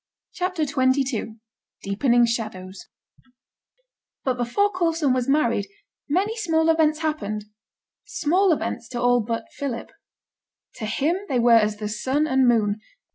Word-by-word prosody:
CHAPTER 365 -2 -2
XXII 260 -5 0 0.5
DEEPENING 235 +5 +3
SHADOWS 205 -5 -5 1.4
But 260 -2 0
before 245 +13 +1
Coulson 330 -7 +1
was 255 0 -1
married, 235 -8 +2 0.4
many 390 +9 +1
small 325 -6 +2
events 315 -1 +2
happened 215 -10 -2 0.6
small 360 +4 +2
events 240 -6 -2
to 245 - -4
all 245 0 +3
but 230 0 -3
Philip. 270 -5 -5 0.9
To 215 - -4
him 290 +11 0
they 260 - +1
were 240 0 +4
as 215 -2 +4
the 210 0 -4
sun 260 +8 0
and 265 -3 +3
moon. 215 -3 +2
255 Hz, 130 wpm, -23 LUFS, 225-310 Hz, 1.4 s, were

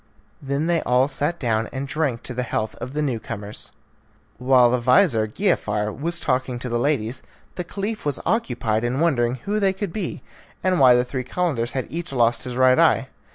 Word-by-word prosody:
Then 140 +2 -1
they 170 -1 +1
all 125 +2 +2
sat 145 +4 -1
down, 110 -3 0
and 135 +1 -4
drank 140 -6 -1
to 125 - -4
the 125 - -2
health 110 -3 -2
of 130 - -6
the 150 +1 -1
new 130 -6 -1
comers. 105 0 -3 0.7
While 125 -1 +5
the 125 - +1
vizir, 125 - +3
Giafar, 105 - 0
was 170 +4 -2
talking 130 -4 -1
to 125 +1 -4
the 120 0 0
ladies 130 -2 -1 0.3
the 180 - -4
Caliph 205 +5 -4
was 145 -3 -2
occupied 120 - 0
in 120 +3 -1
wondering 125 -7 +2
who 210 +1 0
they 195 -2 +2
could 190 -2 -5
be, 200 -5 -4 0.4
and 185 -1 +2
why 130 -2 +7
the 125 0 +2
three 130 0 -4
Calenders 130 -5 -1
had 130 - -2
each 170 0 -4
lost 120 -2 +2
his 125 -1 -5
right 130 0 +4
eye. - - +3
130 Hz, 200 wpm, -23 LUFS, 120-165 Hz, 0.7 s, why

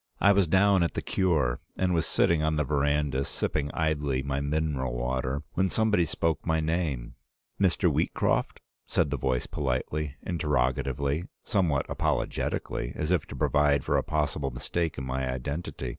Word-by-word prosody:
I 100 - +6
was 100 -3 +3
down 95 +2 +4
at 85 - 0
the - - -2
Cure, 80 -11 +1 0.2
and 95 -1 +1
was 80 -2 +1
sitting 85 -2 +3
on 80 0 +1
the 75 - +1
veranda 70 -1 +1
sipping 75 +1 -2
idly 75 -4 0
my 70 0 -2
mineral 70 -4 -1
water, 65 +3 -2
when 95 +1 +1
somebody 105 -5 +2
spoke 80 0 -1
my 80 -1 +1
name. 80 -6 -1 0.5
'Mr. 95 -4 +3
Wheatcroft?' - - 0 0.3
said 75 -5 +1
the 70 - 0
voice 65 -1 0
politely, 70 +2 -2
interrogatively, 70 -1 0 0.2
somewhat 85 -9 +1
apollogetically, - - -2
as 75 +2 -2
if 90 -5 +1
to - - -8
provide 75 -2 +2
for - - 0
a - - +3
possible 75 -2 -1
mistake 70 +6 -2
in 65 - -4
my 65 0 -2
identity. 65 +1 -4
75 Hz, 160 wpm, -28 LUFS, 65-80 Hz, 0.5 s, I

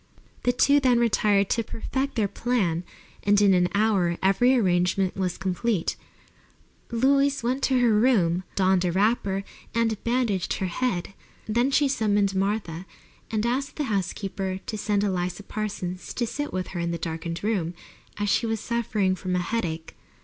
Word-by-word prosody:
The 245 - +5
two 280 +3 +4
then 255 -3 +3
retired 210 -4 +3
to 230 - +1
perfect 265 +5 -3
their 215 -4 +2
plan, 195 -8 0 0.4
and 205 0 +3
in 200 -2 +5
an 180 -1 +3
hour 200 -5 +2
every 220 +7 +4
arrangement 185 -3 +1
was 185 -2 -2
complete. 190 +1 -1 0.9
Louise 275 +3 +2
went 255 +3 0
to 265 - +2
her 235 -2 +4
room, 200 -7 +3
donned 190 -1 +3
a 180 - +1
wrapper, 195 0 +1 0.3
and 225 -2 0
bandaged 230 -6 0
her 190 - -2
head. 185 -1 -2 0.3
Then 240 +4 +1
she 285 +1 +3
summoned 205 -6 +1
Martha 190 -3 -2 0.4
and 215 0 -1
asked 265 +4 -1
the 300 - -2
housekeeper 190 0 -2
to - - -4
send 205 -1 0
Eliza 180 -1 -2
Parsons 190 -3 -5
to 240 - 0
sit 290 +6 -4
with 185 0 -3
her 175 - -5
in 170 0 -1
the 170 - -2
darkened 165 +1 -4
room, 185 -6 -1 0.4
as 205 0 -1
she 230 +3 +2
was 225 -1 -1
suffering 220 -4 0
from 185 0 -3
a - - +1
headache. 175 -5 -3
205 Hz, 165 wpm, -25 LUFS, 185-235 Hz, 0.9 s, The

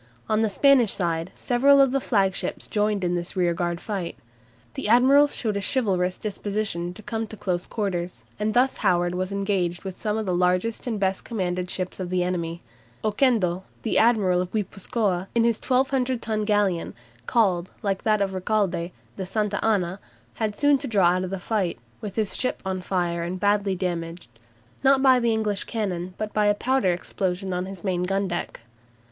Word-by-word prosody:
On 215 0 +2
the 220 - +2
Spanish 245 +1 +4
side 170 -1 -1
several 275 +3 +4
of 270 -2 +5
the 275 - +1
flagships 195 -7 0
joined 210 -2 0
in 175 0 +1
this 175 0 -3
rearguard 175 -1 0
fight. 195 -5 -4 0.6
The - - -3
admirals 275 +5 +5
showed 215 -4 -1
a - - -2
chivalrous 190 -6 0
disposition 205 -4 -3
to 215 - -11
come 225 +1 -3
to 215 - -10
close 180 -3 -2
quarters, 180 -5 -3 0.2
and 215 0 -1
thus 255 +2 +3
Howard 175 -1 +2
was 185 +1 -2
engaged 195 -3 -1
with 190 -2 -7
some 215 -1 -1
of 220 - -2
the 185 - 0
largest 180 +7 +1
and 225 -4 -1
best 190 -1 0
commanded 180 -5 -2
ships 185 0 -3
of 185 -2 -3
the 180 -1 +1
enemy. 170 -2 -3 0.4
Oquendo, 210 -5 +2 0.2
the 225 - +2
admiral 205 -6 +3
of 180 - -4
Guipuzcoa, 195 -2 -1
in 230 - +4
his 230 -1 +1
1200 260 -1 +1
ton 215 -2 -2
galleon, 205 -5 +1 0.3
called, 185 -6 +2
like 195 -2 0
that 215 -2 +2
of 195 -1 -3
Recalde, 185 -3 0 0.3
the 190 - -3
"Santa 210 0 -1
Ana," 195 -4 +1 0.3
had 215 -2 -2
soon 290 -1 +4
to 275 - -4
draw 200 -7 +4
out 180 +1 +1
of - - -5
the 195 - -3
fight, 190 -2 -1 0.2
with 200 -2 -6
his 215 -3 -1
ship 255 - -2
on 190 -1 -2
fire 175 -2 -1
and 175 +2 -3
badly 205 -1 +2
damaged, 175 -4 -4 0.5
not 270 0 +5
by 260 -2 +6
the 235 -1 +2
English 215 -2 -1
cannon, 185 -5 -3
but 215 -1 -4
by 210 -1 +2
a 205 - +4
powder 260 -2 +1
explosion 180 +1 -2
on 180 +1 -2
his 195 -2 -9
main 185 -3 0
gundeck. 185 -6 -2
195 Hz, 185 wpm, -25 LUFS, 180-220 Hz, 0.6 s, by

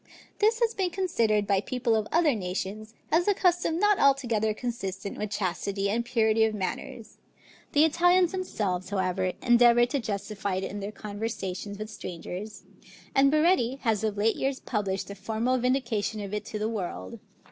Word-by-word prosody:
This 440 +2 +3
has 460 -1 +2
been 375 -2 0
considered 230 - +1
by 195 -1 +2
people 240 0 0
of 215 -1 0
other 325 -3 +4
nations, 205 +2 -4 0.2
as 340 +4 +3
a 410 - +4
custom 350 -3 +2
not 415 +2 +3
altogether 240 -6 +3
consistent 205 -4 -4
with 210 - -4
chastity 200 0 -1
and 235 +3 0
purity 225 -2 +2
of 220 -1 +1
manners; 210 +3 -5 0.5
the 300 +2 +6
Italians 355 +2 +4
themselves 200 - -2
however, 185 -2 0
endeavor 240 0 +6
to 280 +3 -2
justify 200 -3 -3
it 190 - -2
in 200 +2 -4
their 200 +1 -5
conversations 205 -2 -5
with 215 +1 -6
strangers, 195 +2 -7 0.5
and 275 +1 +5
Baretti 305 -5 +3
has 220 -3 0
of 215 -2 -1
late 220 +2 +2
years 270 0 -1
published 200 -3 -2
a - - -5
formal 225 +6 -1
vindication 235 -4 0
of 200 -1 -6
it 210 0 -3
to 215 - -5
the 210 +1 -1
world. 175 - -5
220 Hz, 170 wpm, -27 LUFS, 200-270 Hz, 0.5 s, the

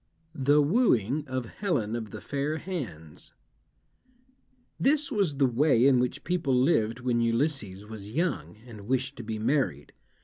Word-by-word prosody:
THE 145 0 +3
WOOING 145 - +2
OF 130 -1 -3
HELEN 120 - -2
OF 110 -3 -5
THE - - -8
FAIR 145 +2 -2
HANDS 110 - -7 1.5
This 290 +2 +2
was 195 - +1
the 135 0 +3
way 125 0 +3
in 135 -2 +5
which 125 +3 -2
people 165 -7 0
lived 125 -3 +2
when 120 -2 +1
Ulysses 115 -5 -1
was 105 -2 -9
young, 165 -3 -2
and 105 -4 -11
wished 130 +2 -1
to 120 - -7
be 110 0 -4
married. 110 - -1
130 Hz, 145 wpm, -28 LUFS, 110-150 Hz, 1.5 s, in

